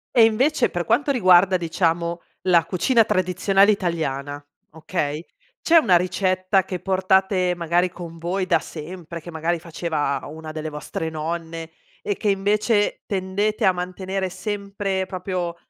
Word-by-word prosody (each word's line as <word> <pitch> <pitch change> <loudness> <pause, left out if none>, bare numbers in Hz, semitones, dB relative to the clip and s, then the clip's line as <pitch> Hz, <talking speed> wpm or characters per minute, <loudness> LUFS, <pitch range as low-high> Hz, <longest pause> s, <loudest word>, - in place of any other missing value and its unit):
E 235 - +7
invece 255 +8 +2
per 175 -2 -3
quanto 290 0 +1
riguarda, 185 -7 +5
diciamo, 170 0 -1 0.2
la 175 -3 +4
cucina 230 +6 +3
tradizionale 195 +2 +3
italiana, 145 -7 -2 0.3
okay, 160 -1 -3 0.3
c'è 335 - +4
una 195 - +5
ricetta 185 +1 +1
che 185 - -4
portate, 190 -1 +2
magari, 175 +1 +1
con 170 -2 -9
voi 185 +3 -1
da 170 -3 +3
sempre, 170 +1 -8
che 175 - -9
magari 165 +2 -1
faceva 160 -4 -2
una 155 +1 -8
delle 155 0 -5
vostre 150 +2 -5
nonne 165 +1 -5 0.3
e 415 -3 -1
che 215 - -1
invece 205 +2 +1
tendete 200 +2 -1
a 190 - +6
mantenere 185 +1 -3
sempre, 200 -1 -3
proprio 180 -2 -3
180 Hz, 140 wpm, -22 LUFS, 165-195 Hz, 0.3 s, E